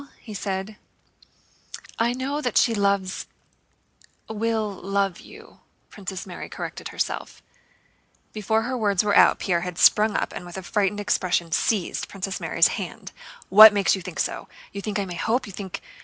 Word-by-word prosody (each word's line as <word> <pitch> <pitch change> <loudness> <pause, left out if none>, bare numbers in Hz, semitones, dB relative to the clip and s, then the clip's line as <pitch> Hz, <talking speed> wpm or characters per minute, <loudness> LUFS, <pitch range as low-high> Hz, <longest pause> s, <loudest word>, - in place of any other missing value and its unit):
he 220 - -10
said. 195 +1 -4 1.2
"I 235 +1 +2
know 270 +4 -3
that 245 -6 -1
she 230 - +4
loves... 200 -2 0 1.0
will 220 -1 -1
love 195 -1 -2
you," - - -15 0.3
Princess 190 -3 -7
Mary 180 -2 -8
corrected - - -6
herself. - - -4 0.9
Before 220 +1 0
her 255 +3 -3
words 205 -5 +1
were 205 -1 +1
out, - - +6
Pierre 175 -3 0
had 180 -1 -5
sprung 210 0 +5
up - - -2
and - - -7
with 175 +1 -9
a 190 - -6
frightened 205 +2 0
expression 185 -4 0
seized 190 +3 0
Princess 195 0 -5
Mary's - - +3
hand. - - -6 0.4
"What 215 +2 +10
makes 200 -1 +2
you 190 - -6
think 180 -2 -8
so? - - -2 0.2
You 200 - -6
think 210 0 -3
I 200 - -1
may 180 - -7
hope? 225 +9 -1
You 200 - -10
think...?" 190 -1 -7
200 Hz, 165 wpm, -24 LUFS, 190-215 Hz, 1.2 s, What